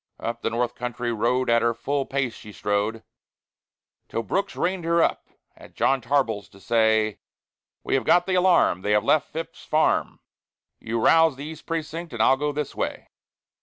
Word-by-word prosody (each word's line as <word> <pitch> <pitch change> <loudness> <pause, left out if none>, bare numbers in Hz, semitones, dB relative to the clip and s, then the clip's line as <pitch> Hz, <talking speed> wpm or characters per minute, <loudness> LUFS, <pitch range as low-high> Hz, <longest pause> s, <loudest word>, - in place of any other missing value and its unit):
Up 115 0 -4
the - - 0
North 120 +1 -1
Country 120 -1 -3
road 125 +4 +1
at 115 0 +4
her 115 0 +1
full 135 +4 -2
pace 135 -3 -1
she 105 - -12
strode, 105 +2 -2 1.1
Till 115 - -2
Brooks 195 - -2
reined 180 0 -1
her 170 0 +3
up - - -1 0.3
at - - -16
John 135 -1 +2
Tarbell's 120 -6 0
to 100 - -18
say, 110 0 +2 0.6
"We - - -2
have 135 -2 +2
got 175 +9 +4
the 190 - -1
alarm, 180 - +3
they 105 +2 0
have 105 -1 +3
left 155 +6 +2
Phips's 165 +1 -7
farm; 155 +1 +1 0.6
You 115 +1 -3
rouse 160 +5 +5
the 140 +2 -8
East 160 0 -9
Precinct, 165 0 -4
and 115 -2 +1
I'll 130 - +5
go 145 +2 -1
this 145 -1 -4
way." - - -4
125 Hz, 180 wpm, -24 LUFS, 115-155 Hz, 1.1 s, rouse